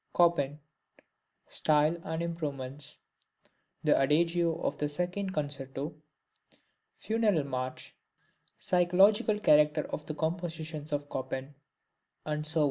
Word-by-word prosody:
Chopin 160 -5 +3 0.9
Style 155 +1 +2
and 160 +1 -3
Improvements 145 -5 -4 0.9
The - - +4
Adagio 165 +4 +2
of - - -1
the 150 - 0
Second 180 +5 -2
Concerto 145 -2 -4 1.0
Funeral 215 - +1
March 130 -2 -4 0.6
Psychological 190 +4 +4
Character 150 -5 +4
of 150 - -5
the 155 - -4
Compositions 160 -2 -3
of 145 0 -1
Chopin, 135 +1 -4 0.9
&c. 160 +2 0
155 Hz, 95 wpm, -30 LUFS, 145-175 Hz, 1.0 s, The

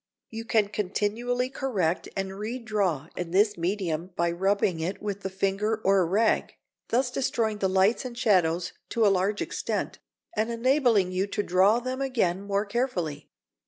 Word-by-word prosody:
You 225 0 -6
can 215 -3 +2
continually 220 +5 -1
correct 200 -12 -1
and 195 0 -2
redraw 205 - -2
in 175 -1 -4
this 205 +4 +3
medium 175 -1 -2
by 170 0 +1
rubbing 190 -1 +1
it 175 +5 -3
with 200 -1 -4
the 190 - -3
finger 195 +3 0
or 195 0 +4
a 180 - +3
rag, 210 +6 +1 0.3
thus 250 +1 +1
destroying 225 -5 -1
the 190 - +1
lights 190 +6 +3
and 245 -2 -7
shadows 175 -7 +2 0.2
to 230 -2 +2
a 200 - +5
large 195 +3 0
extent, - - -3 0.4
and 220 +1 0
enabling 235 -5 +2
you 185 +2 0
to 205 - -2
draw 190 +5 +4
them 255 +2 -4
again 220 -9 0
more 200 +1 -1
carefully. 195 - -2
200 Hz, 160 wpm, -27 LUFS, 185-230 Hz, 0.4 s, a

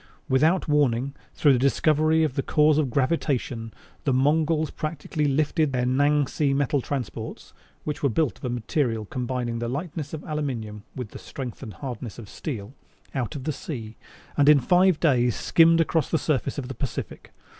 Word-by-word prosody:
Without 155 +8 +3
warning, 140 -3 +2 0.2
through 145 -3 +5
the 125 - +2
discovery 155 +4 +3
of 155 -5 0
the 135 - 0
cause 150 +2 +3
of 145 -4 +1
gravitation, 130 -4 -1 0.3
the 140 - +1
Mongols 155 +4 +2
practically 155 -1 -3
lifted 145 +1 +1
their 125 -1 +1
Nangsi 145 +1 +2
metal 140 0 +1
transports 120 -4 -5 0.3
(which 150 -1 -4
were 140 - +3
built 150 +3 0
of - - -7
a - - -1
material 120 -1 -1
combining 120 0 -3
the 115 0 -2
lightness 150 +2 -4
of 155 -2 -6
aluminum 125 -9 -4
with 125 -5 -5
the - - -10
strength 130 -4 -7
and 110 -6 -8
hardness 125 -4 -6
of 110 -4 -10
steel) 120 -5 -6 0.4
out 125 -4 -2
of 135 - -5
the 155 - -1
sea; 115 -7 -6 0.4
and 145 0 +5
in 150 -2 +8
five 180 +5 +4
days 125 -7 +3
skimmed 165 0 +4
across 165 -1 +1
the 160 - +2
surface 140 -3 -1
of 135 -3 -4
the 135 - -5
Pacific. 135 -2 -5
140 Hz, 175 wpm, -25 LUFS, 125-155 Hz, 0.4 s, in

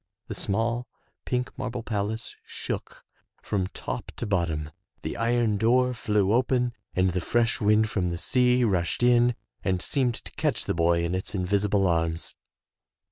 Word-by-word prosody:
The - - -2
small, 115 +4 -1 0.4
pink 125 0 -2
marble 125 -2 -3
palace 110 0 -3
shook - - -6 0.4
from 95 -3 0
top - - -5
to - - -4
bottom, 85 -6 -1 0.3
the - - -3
iron 115 -2 +2
door 125 +3 +3
flew 105 -3 +1
open 125 0 +2 0.2
and 90 0 +3
the 90 0 -1
fresh 115 +5 +1
wind 105 +1 +4
from 95 -4 -1
the 85 - -2
sea 125 +6 +3
rushed 95 0 +1
in 120 0 +5 0.3
and 95 -2 +1
seemed 125 +3 0
to - - -10
catch - - -1
the - - 0
boy 85 0 +2
in 85 +1 -1
its 95 +3 -3
invisible 100 +1 +2
arms. 80 -1 0
105 Hz, 155 wpm, -27 LUFS, 90-120 Hz, 0.4 s, in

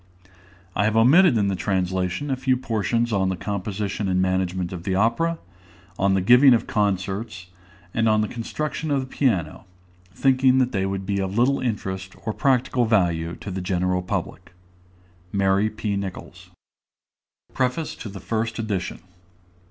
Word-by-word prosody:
I 100 - +2
have 110 0 +1
omitted 140 +5 +6
in 100 -2 +2
the 100 - 0
translation 95 +6 -1
a - - +2
few 130 0 +1
portions 115 -1 -1
on 95 -2 +1
the 95 - -1
composition 100 +1 -3
and 95 -1 +1
management 95 -1 -1
of 90 - -6
the 95 +2 -2
opera, 115 - +1 0.6
on 95 0 +3
the 95 - +1
giving 125 +6 +7
of 115 - -1
concerts, 95 -1 -2 0.4
and 115 -1 +2
on 110 0 +3
the 105 - 0
construction 150 +7 -4
of 140 -2 +1
the - - -5
piano, 105 - -1 0.5
thinking 130 +3 +3
that 130 -1 +2
they 95 -4 0
would 95 0 -3
be 100 0 -1
of 95 +2 -3
little 135 +4 +3
interest 95 -5 -4
or 110 - -1
practical 130 -2 +1
value 85 -6 +1
to 100 - -6
the 95 0 -4
general 90 0 0
public. 90 - -5 0.8
MARY 100 +1 +2
P. 105 -1 -3
NICHOLS. 90 -2 -7 1.0
PREFACE 130 +5 -1
TO 110 - -8
THE 100 0 -8
FIRST 115 +4 -2
EDITION. 105 -6 -3
100 Hz, 160 wpm, -23 LUFS, 95-120 Hz, 1.0 s, giving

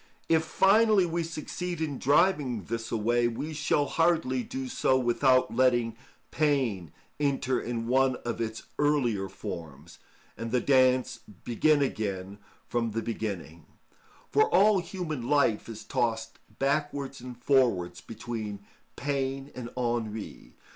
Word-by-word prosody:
If 160 -1 +3
finally 200 +4 +4
we 170 0 -1
succeed 170 +2 -5
in 150 -4 -3
driving 145 - +2
this 115 +4 -4
away, 120 +2 +2
we 145 +7 -4
shall 150 -1 +1
hardly 160 -6 +1
do 130 +1 -5
so 130 +1 +2
without 130 +1 +3
letting 120 -3 +2 0.4
pain 130 - 0 0.3
enter 135 -3 +1
in 115 -1 -3
one 130 +2 +3
of 120 -1 -3
its 110 -1 -4 0.2
earlier 125 -10 +1
forms, 80 -4 -8 0.4
and 115 +1 -5
the 125 +2 +2
dance 130 -1 +3 0.2
begin 145 +5 +3
again 100 -5 -3 0.3
from 115 -2 -1
the 115 0 -2
beginning; 95 -8 -5 0.6
for 145 - +4
all 200 +2 +5
human 165 -8 -5
life 140 -7 +2
is 110 -1 -7
tossed 115 +1 -2 0.2
backwards 140 -1 -1
and 125 -1 -8
forwards 115 -10 +1
between 110 -3 -6 0.3
pain 135 0 -2
and 120 -2 -7
ennui. 115 -3 -3
125 Hz, 125 wpm, -28 LUFS, 115-145 Hz, 0.6 s, all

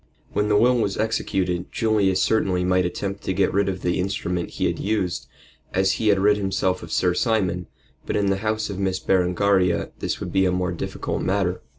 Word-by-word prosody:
When 105 - +1
the 105 -1 +3
will 125 +3 +4
was 100 -3 -1
executed 95 -5 -1
Julius 105 -4 +2
certainly 95 -5 +1
might 90 0 +2
attempt 100 +2 -4
to 95 - -1
get 95 0 +2
rid 100 0 +2
of 90 -2 -5
the 90 +1 0
instrument 90 -2 -2
he - - 0
had - - -1
used, 100 -4 -1 0.5
as 95 +1 +3
he 110 - -1
had 100 -2 +5
rid 105 +2 +3
himself 95 -2 0
of 85 - -9
Sir 90 -1 +2
Simon, 95 -5 0 0.4
but - - -1
in 100 -1 +2
the 95 - +1
house 110 0 -2
of 95 - -5
Miss 95 -1 0
Berengaria 95 0 +1
this - - -2
would - - -6
be 95 0 +3
a - - +1
more 90 0 -1
difficult 85 - -4
matter. 95 -2 0
95 Hz, 205 wpm, -23 LUFS, 90-105 Hz, 0.5 s, had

